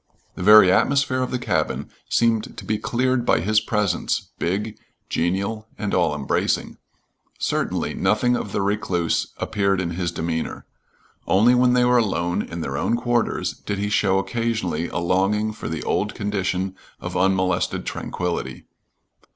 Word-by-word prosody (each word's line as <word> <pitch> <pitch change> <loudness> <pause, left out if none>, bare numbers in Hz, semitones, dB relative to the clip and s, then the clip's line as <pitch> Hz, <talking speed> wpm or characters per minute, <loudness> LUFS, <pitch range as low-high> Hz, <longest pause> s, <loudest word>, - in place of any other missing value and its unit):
The - - -8
very 105 -1 +8
atmosphere 135 +5 +2
of 130 - -1
the 125 - -1
cabin 90 -10 -2 0.2
seemed 115 -2 +1
to - - -8
be 110 -1 -1
cleared 130 0 0
by - - +3
his 105 +5 +2
presence, 105 -5 -1
big, 105 +5 -2 0.3
genial, 100 +6 -1
and 105 -2 -3
all 85 -5 +2
embracing. 70 -2 -1 0.6
Certainly - - -1
nothing 125 +3 +2
of 105 - -4
the 100 - -1
recluse 95 -4 0
appeared 100 -2 0
in 85 -2 -2
his 85 0 -2
demeanor. 80 -1 -3 0.6
Only 110 +6 +5
when 125 0 +4
they 125 0 +4
were 125 0 +4
alone 90 -6 0
in 85 0 -6
their 70 -2 -3
own 115 - +1
quarters 120 -1 0
did 105 - -5
he 105 +1 -1
show 100 -2 +2
occasionally 110 -6 -1
a - - -5
longing 95 +5 +1
for - - -6
the 80 -1 -4
old 105 +1 -1
condition 95 -2 -2 0.2
of - - -6
unmolested 95 -1 +1
tranquillity. 85 -8 -4
100 Hz, 150 wpm, -23 LUFS, 90-110 Hz, 0.6 s, very